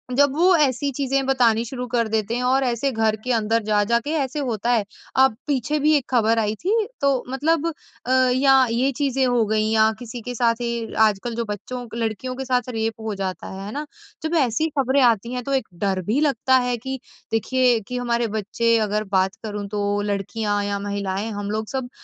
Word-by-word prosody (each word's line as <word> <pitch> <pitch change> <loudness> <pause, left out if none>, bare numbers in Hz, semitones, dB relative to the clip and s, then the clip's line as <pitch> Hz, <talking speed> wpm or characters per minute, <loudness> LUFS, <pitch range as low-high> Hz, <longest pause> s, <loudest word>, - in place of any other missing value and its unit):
जब 285 -1 +4
वो 360 +2 +5
ऐसी 280 -1 +1
चीज़ें 275 0 0
बतानी 240 -4 +3
शुरू 250 +1 -5
कर 230 -1 0
देते 220 +1 -1
हैं 250 - -1
और 265 +2 +2
ऐसे 245 +3 0
घर 220 -2 +1
के 250 - -1
अंदर 225 0 +1
जा-जा 215 +2 +2
के 290 +6 -5
ऐसे 275 +2 -2
होता 240 -4 -2
है 225 -4 +3 0.4
अब 265 -5 +3
पीछे 290 +1 0
भी 305 +2 +3
एक 275 - -3
खबर 230 -2 +3
आई 215 0 0
थी 395 +4 +1 0.3
तो 275 -2 +2
मतलब 315 +4 +1 0.4
अ, 255 - -2 0.2
या 265 -1 +5
ये 260 +4 +1
चीज़ें 270 -2 +1
हो 245 -3 +2
गई 215 0 +1
या 220 0 +4
किसी 240 0 -7
के 245 +2 -6
साथ 230 0 +1
ये 235 -1 -3
आजकल 220 +2 +2
जो 235 -1 -2
बच्चों 245 +5 -5
लड़कियों 230 +3 -3
के 265 0 -5
साथ 250 -1 0
रेप 225 -1 -2
हो 220 -2 -3
जाता 190 -1 -4
है 195 +1 -7
है 210 - -6
ना, 295 +1 -4 0.4
जब 320 +2 -1
ऐसी 265 +5 +1
खबरें 265 +1 +3
आती 235 0 +2
हैं 250 -1 -3
तो 275 - -3
एक 265 -4 0 0.2
डर 190 -1 0
भी 235 +7 +1
लगता 260 -2 +3
है 245 - 0
कि 265 +2 -5 0.3
देखिए 245 +1 +2
कि 250 - -4
हमारे 240 -1 0
बच्चे 230 +3 +1
अगर 210 +1 -1
बात 190 +1 +2
करूँ 205 -2 -4
तो 205 0 -1
लड़कियाँ 205 +1 -1
या 200 0 -2
महिलाएँ 200 +1 -3
हम 205 0 -4
लोग 215 0 -2
सब 260 -2 -3
235 Hz, 210 wpm, -22 LUFS, 215-265 Hz, 0.4 s, वो